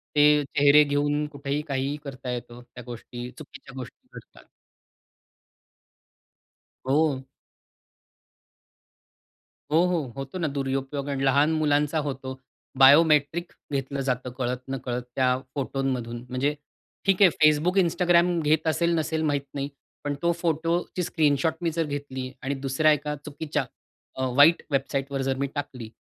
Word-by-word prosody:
ते 150 0 +5
चेहरे 145 +2 +5
घेऊन 145 +1 0
कुठेही 140 0 -3
काहीही 135 +1 -1
करता 130 -2 -6
येतं, 120 0 -6
त्या 120 - -8
गोष्टी 120 0 -8
चुकीच्या 140 -2 -12
गोष्टी 125 - -10
घडतात. - - -13 2.4
हो. 140 -1 +2 2.5
हो, 160 +2 +5
हो. 165 -8 -1
होतो 135 +6 -6
ना 165 - 0
दुरुपयोग 135 +1 -2
आणि 135 -1 -1
लहान 140 +4 +4
मुलांचा 150 0 +1
होतो. 130 -1 -5 0.4
बायोमेट्रिक 150 +4 +5 0.2
घेतलं 140 0 -2
जातं 125 -1 -2
कळत-नकळत 125 0 -3
त्या 130 -1 +2 0.2
फोटोमधून 130 -4 -2
म्हणजे 135 +4 0 0.5
ठीक 195 -1 +2
आहे 190 - +9
Facebook, 155 +5 +4
Instagram 175 0 +3
घेत 155 +1 +1
असेल-नसेल 160 -1 +1
माहीत 145 -1 0
नाही. 140 0 -3 0.3
पण 145 -1 -1
तो 170 0 +3
फोटोची 170 +2 -1
स्क्रीनशॉट 155 -1 +1
मी 170 - +1
जर 165 0 -1
घेतली 140 -3 -5
आणि 135 +2 -2
दुसऱ्या 155 +4 +3
एका 150 0 -1
चुकीच्या 150 -1 -3 0.5
अ, 130 - -3
वाईट 150 +5 +6
वेबसाईटवर 135 0 -1
जर 135 0 0
मी 140 - -1
टाकली, 130 -6 -5
145 Hz, 125 wpm, -26 LUFS, 135-155 Hz, 2.5 s, आहे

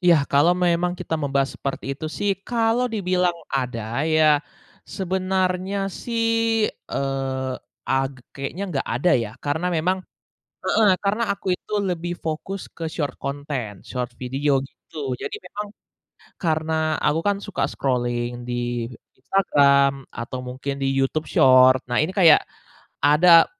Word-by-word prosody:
Iya, 175 -2 +6 0.2
kalau 165 +6 +5
memang 175 0 +2
kita 175 -3 -3
membahas 140 -1 0
seperti 135 0 -3
itu 145 +3 -5
sih, 200 +5 -1 0.2
kalau 235 +1 +2
dibilang 180 -5 0 0.2
ada 120 -2 -2
ya 155 -2 +4 0.5
sebenarnya 185 0 -1 0.2
sih, 230 -1 -2 0.6
eee, 135 -1 -2 0.4
ag 135 +1 +1 0.2
kayaknya 140 +8 -5
nggak 135 - -2
ada 160 +9 +2
ya. 110 -2 -3
Karena 160 +5 0
memang 185 +4 +1 0.7
heeh, 220 -2 +4 0.2
karena 210 +4 +1
aku 195 - -18
itu - - -13 0.2
lebih 175 0 -3
fokus 170 +5 -3
ke 165 - -7
short 145 -4 -2
content, 140 -7 -4
short 125 -1 -3
video, 135 +2 +1
gitu. 140 -1 -7
Jadi - - -4
memang 210 0 -5 0.8
karena 160 -1 0 0.3
aku 150 +2 +2
kan 200 -1 +2
suka 205 - -3
scrolling 120 -2 -1
di 120 -1 -2 0.3
Instagram 140 -4 +3
atau 120 +2 -5
mungkin 130 +2 -4
di 135 - 0
YouTube 135 +4 0
Short, 130 0 +6
nah 120 - +1
ini 155 +4 +1
kayak 170 -6 +7 0.6
ada 165 +4 +7
150 Hz, 130 wpm, -23 LUFS, 135-180 Hz, 0.8 s, kayak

